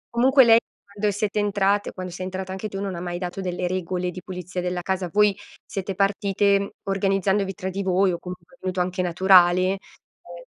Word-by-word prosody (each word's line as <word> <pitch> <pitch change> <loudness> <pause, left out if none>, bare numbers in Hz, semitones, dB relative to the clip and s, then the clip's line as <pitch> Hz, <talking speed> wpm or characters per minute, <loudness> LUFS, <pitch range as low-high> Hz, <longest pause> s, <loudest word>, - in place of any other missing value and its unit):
Comunque 265 +2 +6
lei, 230 -1 +7 0.3
quando 205 0 0
siete 205 +1 -1
entrate, 205 0 +1
quando 185 -1 -7
sei 185 +1 -6
entrata 190 0 -5
anche 190 +3 -4
tu, 195 - -5
non 195 -2 -3
ha 170 - -5
mai 175 0 -4
dato 180 +1 -5
delle 180 -1 -2
regole 180 0 -2
di 185 - -9
pulizia 180 -1 -6
della 180 0 -3
casa. 190 -2 -2
Voi 210 -1 +4 0.3
siete 195 -2 -4
partite 200 0 +1
organizzandovi 195 0 0
tra 190 -1 -4
di 195 +2 -3
voi 190 0 +2
o 170 - -3
comunque 180 +4 -10
è - - -37
venuto 185 -1 -3
anche 185 +1 -1
naturale? 180 0 +5
Ehm - - -16
190 Hz, 195 wpm, -24 LUFS, 180-200 Hz, 0.3 s, lei